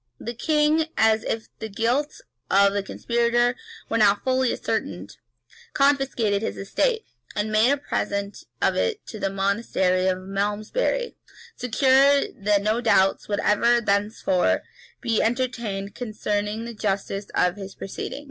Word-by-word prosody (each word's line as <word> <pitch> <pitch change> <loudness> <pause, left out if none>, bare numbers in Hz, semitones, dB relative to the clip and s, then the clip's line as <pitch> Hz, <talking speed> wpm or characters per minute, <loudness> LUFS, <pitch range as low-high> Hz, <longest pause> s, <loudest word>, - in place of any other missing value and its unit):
The 235 - -5
king, 305 +4 +2
as 220 0 +3
if 225 0 -3
the 220 - -5
guilt, 245 - -1 0.3
of 200 0 +4
the 200 - 0
conspirator 235 +4 +1 0.3
were 230 - 0
now 205 -1 +5
fully 260 -1 +2
ascertained, 100 - -4 0.6
confiscated 270 -7 +2
his 225 - -3
estate, 445 - 0 0.3
and 210 0 -1
made 215 +3 +4
a 285 - +3
present 200 -7 -3 0.2
of - - +3
it 450 -3 -1
to 215 - -7
the 195 - 0
monastery 195 -2 0
of 185 -1 +1
Malmesbury,[*] 205 - -2 0.4
secure 270 +3 +4
that 200 0 +1
no 215 +3 +1
doubts 195 -5 +3
would 205 - -1
ever 235 +3 +3
thenceforth 200 -3 +1 0.4
be 230 -3 +1
entertained 225 -5 -2
concerning 215 -1 -3
the 235 - -6
justice 200 -1 -2
of 180 0 +2
his 195 -1 -9
proceedings. 195 - -6
220 Hz, 140 wpm, -24 LUFS, 200-245 Hz, 0.6 s, now